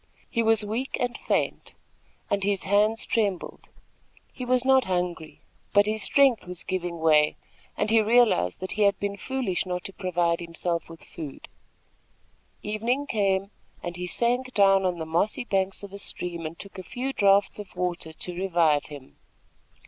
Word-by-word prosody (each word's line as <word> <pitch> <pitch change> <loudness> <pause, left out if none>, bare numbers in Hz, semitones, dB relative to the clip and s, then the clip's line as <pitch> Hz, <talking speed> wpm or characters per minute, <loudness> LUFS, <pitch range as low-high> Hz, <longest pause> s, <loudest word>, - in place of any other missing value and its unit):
He 230 - +1
was 220 -2 +3
weak 230 +6 -2
and 245 -1 -1
faint, - - -2 0.6
and 200 -1 +1
his 200 -1 0
hands 210 +3 +2
trembled. 200 -6 -2 0.6
He 255 - -6
was 250 0 +2
not 265 -1 +5
hungry; 180 -3 -3 0.3
but 205 0 +6
his 215 +1 -1
strength 265 -7 +3
was 180 -1 -4
giving 175 -2 -3
way, 155 -2 +4 0.4
and 210 +1 +1
he 225 0 +6
realized 215 - +3
that 185 - -4
he 215 - -2
had 200 -1 +4
been 200 0 -2
foolish 245 -4 -2
not 180 0 -3
to 195 - -5
provide 175 -3 0
himself 170 0 -3
with 165 -1 -12
food. 150 -4 -9 1.2
Evening 230 +7 -1
came, 200 -5 0 0.3
and 175 0 -4
he 180 0 -4
sank 245 +5 0
down 195 -2 +5
on 180 -1 -2
the 160 - -4
mossy 175 +10 0
banks 195 -3 -1
of 200 -1 -9
a 200 - -7
stream 170 -4 -4
and 165 +2 -10
took 195 0 -10
a - - -6
few 265 +6 -4
draughts 200 -1 +3
of 200 -4 -9
water 180 -2 -2
to 175 +3 -4
revive 170 -5 +2
him. 145 -3 -12
195 Hz, 170 wpm, -26 LUFS, 175-220 Hz, 1.2 s, but